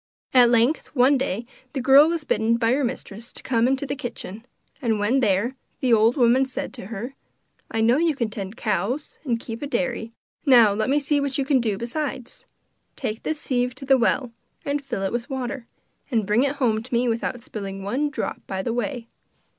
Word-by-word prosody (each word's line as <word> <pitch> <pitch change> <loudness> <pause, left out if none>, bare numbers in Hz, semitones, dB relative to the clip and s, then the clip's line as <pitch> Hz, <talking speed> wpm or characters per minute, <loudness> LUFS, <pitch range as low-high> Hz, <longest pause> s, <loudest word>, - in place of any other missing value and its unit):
At 250 -2 +7
length, 240 +6 +3
one 260 +2 +5
day, 245 -4 -2 0.3
the 275 - -2
girl 270 +4 +7
was 335 -2 -1
bidden 230 -4 +1
by 230 -1 +2
her 275 +3 +2
mistress 235 -2 -5
to - - -7
come 235 -2 +2
into 270 +2 0
the 275 - -3
kitchen, 235 -4 -7 0.3
and 225 -4 +1
when 210 +6 +2
there, 220 +2 +1 0.2
the 250 -3 +2
old 225 +3 +4
woman 250 +1 +5
said 260 -1 -5
to 235 -7 -9
her: 230 +5 -6 0.6
'I 225 - -1
know 235 +4 +4
you 325 -1 +2
can 235 -5 -2
tend 200 +1 -6
cows 215 - -2
and 240 -6 0
keep 230 -1 -7
a 290 - -3
diary; 240 -5 -2 0.3
now 240 -7 +6
let 215 +3 -1
me 285 +2 +3
see 290 0 +1
what 275 -1 -1
you 275 - 0
can 270 -1 +3
do 220 -5 0
besides. 255 +2 -4 0.5
Take 215 +1 -4
this 310 -1 -2
sieve 250 -3 -1
to 270 - -7
the 270 -1 +4
well, 240 +1 +1 0.3
and 285 0 -1
fill 240 -8 -3
it 195 - -1
with 240 +3 -3
water, 260 -2 -4 0.4
and 225 -6 +1
bring 210 +4 +3
it 280 +1 +1
home 230 -6 +1
to 250 - -13
me 245 +1 +2
without 235 +1 -2
spilling 195 -2 -6
one 265 +9 0
drop 285 - -4
by 190 0 -3
the 230 - -1
way. 245 -1 -3
245 Hz, 210 wpm, -24 LUFS, 225-270 Hz, 0.6 s, At